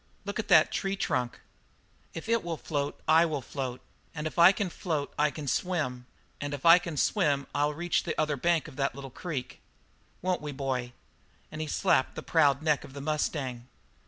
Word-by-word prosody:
"Look 200 Hz, +1 st, -4 dB
at 220 Hz, -, -2 dB
that -, -, +6 dB
tree 195 Hz, 0 st, -1 dB
trunk. 125 Hz, -10 st, -2 dB, 0.7 s
If 165 Hz, -, -6 dB
that 230 Hz, 0 st, +1 dB
will 170 Hz, -2 st, -3 dB
float 145 Hz, -2 st, -3 dB
I 160 Hz, +1 st, +6 dB
will 150 Hz, -3 st, -2 dB
float, 130 Hz, -1 st, -5 dB, 0.3 s
and 150 Hz, 0 st, -4 dB
if 155 Hz, -, -3 dB
I 170 Hz, +2 st, +9 dB
can 200 Hz, -2 st, -2 dB
float 155 Hz, -6 st, -3 dB
I 150 Hz, +1 st, +3 dB
can 150 Hz, 0 st, -7 dB
swim, 130 Hz, -7 st, -1 dB, 0.3 s
and 145 Hz, 0 st, -2 dB
if 140 Hz, -, -10 dB
I 170 Hz, +1 st, +9 dB
can 170 Hz, -4 st, -6 dB
swim 145 Hz, -6 st, +2 dB
I'll 145 Hz, +1 st, +1 dB
reach 175 Hz, +2 st, 0 dB
the 165 Hz, -, -4 dB
other 150 Hz, -1 st, +1 dB
bank 165 Hz, +4 st, +1 dB
of 145 Hz, -3 st, -12 dB
that 135 Hz, -1 st, 0 dB
little 135 Hz, -1 st, -8 dB
creek. 145 Hz, -4 st, -5 dB, 0.6 s
Won't 185 Hz, -2 st, 0 dB
we, 150 Hz, -1 st, -5 dB
boy?" 130 Hz, -3 st, -3 dB, 0.6 s
And 155 Hz, 0 st, -5 dB
he 155 Hz, -, -3 dB
slapped 165 Hz, -3 st, +2 dB
the -, -, -6 dB
proud 145 Hz, -3 st, +3 dB
neck 150 Hz, -3 st, +2 dB
of 130 Hz, -, -12 dB
the 140 Hz, -, -7 dB
mustang. 140 Hz, -5 st, -2 dB
150 Hz, 195 wpm, -29 LUFS, 140-170 Hz, 0.7 s, I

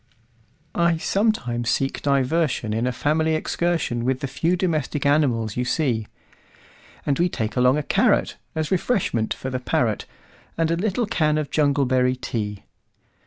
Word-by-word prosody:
I 170 Hz, -1 st, +2 dB
sometimes 160 Hz, -, 0 dB
seek 135 Hz, +2 st, 0 dB
diversionIn 135 Hz, -5 st, +1 dB
a -, -, +1 dB
family 155 Hz, +4 st, +1 dB
excursionWith 130 Hz, -8 st, -1 dB
the -, -, -1 dB
few 165 Hz, +6 st, 0 dB
domestic 155 Hz, -5 st, -1 dB
animals 125 Hz, -7 st, +2 dB
you 125 Hz, -, 0 dB
see; 120 Hz, -5 st, 0 dB, 1.0 s
And 140 Hz, -2 st, 0 dB
we 175 Hz, +1 st, +3 dB
take 110 Hz, -8 st, -3 dB
along 125 Hz, +3 st, +4 dB
a 150 Hz, -, -1 dB
carrotAs 155 Hz, +2 st, 0 dB
refreshment 175 Hz, -, 0 dB
for 130 Hz, -, -3 dB
the 130 Hz, -, -2 dB
parrot, 115 Hz, -3 st, 0 dB, 0.5 s
And 165 Hz, 0 st, +1 dB
a -, -, +2 dB
little 210 Hz, +6 st, 0 dB
can 155 Hz, -7 st, +1 dB
of 150 Hz, -2 st, -3 dB
jungleberry 130 Hz, -4 st, +2 dB
tea. 105 Hz, -4 st, -4 dB
140 Hz, 135 wpm, -23 LUFS, 125-165 Hz, 1.0 s, along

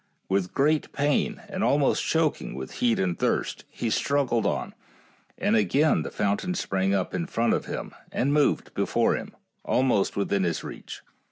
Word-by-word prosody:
With 95 Hz, -1 st, 0 dB
great 150 Hz, +2 st, +2 dB
pain, 150 Hz, -, 0 dB
and 195 Hz, -1 st, -3 dB
al 140 Hz, -, +3 dB
most 145 Hz, -, +2 dB
choking 160 Hz, -2 st, 0 dB
with 65 Hz, 0 st, -6 dB
heat 120 Hz, -2 st, +3 dB
and 90 Hz, -2 st, -1 dB
thirst, -, -, -1 dB
he 115 Hz, -, -3 dB
struggled 135 Hz, -5 st, +1 dB
on, -, -, -2 dB, 0.6 s
and 105 Hz, -, +2 dB
again 135 Hz, -, +3 dB
the -, -, -4 dB
fountain 105 Hz, -, -1 dB
sprang 95 Hz, -, 0 dB
up 95 Hz, -2 st, -1 dB
in 170 Hz, -, -2 dB
front 115 Hz, -7 st, +1 dB
of -, -, -1 dB
him -, -, -5 dB, 0.2 s
and 140 Hz, +4 st, +1 dB
moved 150 Hz, -1 st, +2 dB
before -, -, +1 dB
him, -, -, -7 dB, 0.3 s
almost 125 Hz, -8 st, +1 dB
within 100 Hz, -1 st, +1 dB
his 85 Hz, -3 st, -1 dB
reach. -, -, -8 dB
120 Hz, 170 wpm, -26 LUFS, 100-150 Hz, 0.6 s, al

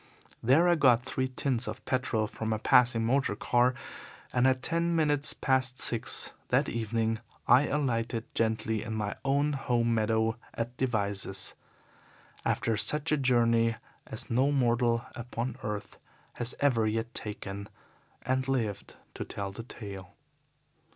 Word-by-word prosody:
There 140 Hz, +9 st, +4 dB
I 175 Hz, -, +5 dB
got 130 Hz, -6 st, +4 dB
three 130 Hz, 0 st, -1 dB
tins 130 Hz, -2 st, 0 dB
of -, -, -6 dB
petrol 125 Hz, -4 st, 0 dB
from 110 Hz, +1 st, -4 dB
a 110 Hz, -, +1 dB
passing 120 Hz, +1 st, +4 dB
motor 130 Hz, -3 st, +1 dB
car, 120 Hz, +3 st, +2 dB, 0.6 s
and 125 Hz, +1 st, +4 dB
at 130 Hz, 0 st, +1 dB
ten 170 Hz, 0 st, +1 dB
minutes 150 Hz, -2 st, +2 dB
past 130 Hz, -1 st, +2 dB
six 115 Hz, -, +2 dB
that -, -, +2 dB
evening 115 Hz, 0 st, -1 dB, 0.3 s
I 130 Hz, +5 st, +6 dB
alighted 115 Hz, -5 st, -1 dB
gently 110 Hz, -1 st, 0 dB
in 110 Hz, 0 st, -4 dB
my 105 Hz, -1 st, -2 dB
own 140 Hz, +2 st, +1 dB
home 120 Hz, -4 st, +1 dB
meadow 110 Hz, +1 st, +1 dB, 0.2 s
at 120 Hz, +2 st, -3 dB
Devizes, 100 Hz, -6 st, -1 dB, 0.9 s
after 115 Hz, -, 0 dB
such 150 Hz, +7 st, -1 dB
a -, -, +5 dB
journey 115 Hz, -3 st, +3 dB, 0.3 s
as 110 Hz, -, -7 dB
no 130 Hz, +4 st, +2 dB
mortal 120 Hz, -3 st, +2 dB
upon 120 Hz, 0 st, -4 dB
earth 105 Hz, -3 st, -5 dB, 0.3 s
has 120 Hz, 0 st, -4 dB
ever 120 Hz, -6 st, +3 dB
yet 115 Hz, +2 st, -2 dB
taken 100 Hz, -1 st, -5 dB, 0.5 s
and 130 Hz, +1 st, 0 dB
lived 115 Hz, -7 st, -2 dB, 0.2 s
to -, -, -5 dB
tell 100 Hz, -1 st, -5 dB
the 100 Hz, -, -7 dB
tale. 100 Hz, -5 st, -9 dB
120 Hz, 140 wpm, -29 LUFS, 110-130 Hz, 0.9 s, I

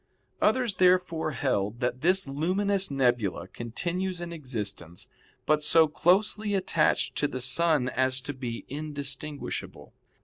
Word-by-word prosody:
Others, 245 Hz, -7 st, +2 dB
therefore, 180 Hz, -3 st, +3 dB
held 105 Hz, -2 st, -1 dB
that 125 Hz, 0 st, -2 dB
this 185 Hz, 0 st, +2 dB
luminous 190 Hz, +7 st, 0 dB
nebula 120 Hz, -7 st, 0 dB
continues 175 Hz, +10 st, -3 dB
in 170 Hz, -1 st, -6 dB
existence, 105 Hz, -, -5 dB, 0.4 s
but 150 Hz, 0 st, +2 dB
so 160 Hz, +1 st, +6 dB
closely 205 Hz, +6 st, +2 dB
attached 185 Hz, -4 st, +1 dB
to 145 Hz, -, +2 dB
the 130 Hz, -, -5 dB
sun 145 Hz, +1 st, +2 dB
as 130 Hz, 0 st, +1 dB
to 145 Hz, +3 st, -5 dB
be 125 Hz, -3 st, -6 dB
indistinguishable. 145 Hz, 0 st, -6 dB
150 Hz, 125 wpm, -27 LUFS, 125-180 Hz, 0.4 s, so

